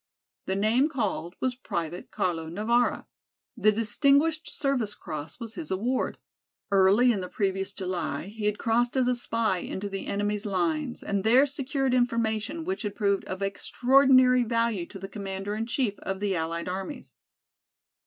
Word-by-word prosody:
The 190 - 0
name 225 +9 +3
called 200 - -2
was 255 -1 0
Private 170 -8 -5
Carlo 165 -3 -2
Navara. 225 +7 +1 0.5
The 215 - +4
Distinguished 280 +9 +2
Service 255 -7 -1
Cross 155 +2 -7
was 230 -2 -5
his 330 +1 -6
award. 235 +7 -1 0.5
Early 200 +6 +5
in 205 -5 -1
the 180 - -6
previous 195 -1 -1
July 185 -2 -3
he 210 +2 -6
had 210 0 +1
crossed 240 +3 +1
as 255 -1 +3
a 250 - +3
spy 230 -5 0
into 200 +3 -5
the 195 0 -5
enemy's 205 +1 -1
lines 175 +1 -1
and 200 -1 -1
there 245 +6 +6
secured 275 -1 -1
information 235 +4 0
which 375 +2 -2
had 205 -3 -4
proved 200 -2 +1
of 185 +1 -4
extraordinary 255 +5 +4
value 230 -6 0
to 195 - -10
the 195 0 -7
commander 195 0 -5
in 220 +2 -3
chief 240 -5 -1
of 195 0 -4
the 200 -2 0
allied 165 +1 -2
armies. 190 +10 -5
215 Hz, 160 wpm, -27 LUFS, 195-250 Hz, 0.5 s, there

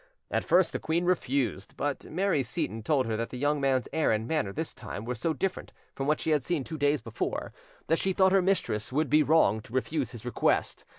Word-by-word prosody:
At - - +1
first - - +4
the - - -3
queen 170 +2 0
refused; 135 - -1
but 145 -1 -3
Mary 185 -2 +1
Seyton 125 -3 -2
told 135 +3 +1
her 110 - -1
that 115 +1 -2
the 125 - -7
young 145 +2 +1
man's 135 -2 +1
air 160 -1 +2
and 110 +1 0
manner 150 -10 0
this 160 +8 -4
time 105 - -7
were 125 - -2
so 145 +8 -1
different 190 +4 -3 0.2
from 135 - -3
what 150 0 +2
she 160 - -1
had 150 -4 +2
seen 160 0 -1
two 160 +3 -6
days 145 0 +2
before, - - -4 0.3
that 165 +2 +1
she 190 - +1
thought 190 0 +4
her 195 0 +5
mistress 175 - 0
would 150 +3 0
be 155 +1 +6
wrong 145 -8 +3
to 115 - -15
refuse 135 +2 -1
his 120 -2 -10
request. 125 - 0
145 Hz, 230 wpm, -28 LUFS, 125-160 Hz, 0.3 s, be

